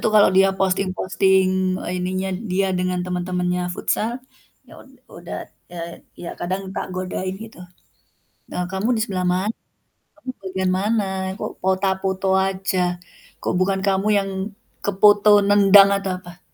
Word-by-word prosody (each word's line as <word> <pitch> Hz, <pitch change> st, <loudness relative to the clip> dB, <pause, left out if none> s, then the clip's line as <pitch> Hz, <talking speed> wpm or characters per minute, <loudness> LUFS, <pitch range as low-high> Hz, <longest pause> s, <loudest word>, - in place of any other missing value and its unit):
itu -, -, +1 dB
kalau 210 Hz, -, +7 dB
dia 195 Hz, +1 st, +5 dB
posting-posting 190 Hz, 0 st, +1 dB, 0.2 s
ininya 185 Hz, +1 st, -2 dB, 0.2 s
dia 195 Hz, +1 st, +1 dB
dengan 180 Hz, 0 st, -1 dB
teman-temannya 180 Hz, 0 st, -1 dB
futsal, 230 Hz, +6 st, -1 dB, 0.5 s
ya -, -, -17 dB
ud -, -, -20 dB, 0.2 s
udat -, -, -8 dB, 0.2 s
eee, 170 Hz, -1 st, -7 dB, 0.2 s
ya 170 Hz, -, -4 dB
kadang 185 Hz, +2 st, -2 dB
tak -, -, -2 dB
godain 185 Hz, 0 st, -3 dB
gitu, 225 Hz, -5 st, -14 dB, 0.9 s
"E -, -, -7 dB, 0.2 s
kamu 190 Hz, +4 st, -1 dB
di -, -, 0 dB
sebelah 185 Hz, -4 st, -2 dB
mana? 185 Hz, +5 st, 0 dB, 0.6 s
Kamu 305 Hz, -4 st, -7 dB
bagian 190 Hz, -1 st, -1 dB
mana? 210 Hz, +1 st, +1 dB, 0.3 s
Kok -, -, -4 dB
fota 190 Hz, +1 st, +2 dB
foto 190 Hz, 0 st, -1 dB
aja? 190 Hz, 0 st, -1 dB, 0.6 s
Kok -, -, 0 dB
bukan 190 Hz, +1 st, +1 dB
kamu 195 Hz, +1 st, +1 dB
yang 195 Hz, -1 st, -1 dB, 0.5 s
kefoto 205 Hz, +1 st, +5 dB, 0.2 s
nendang 200 Hz, -1 st, +7 dB
atau 195 Hz, -1 st, -3 dB
apa?" 175 Hz, 0 st, -13 dB
190 Hz, 140 wpm, -22 LUFS, 185-195 Hz, 0.9 s, kalau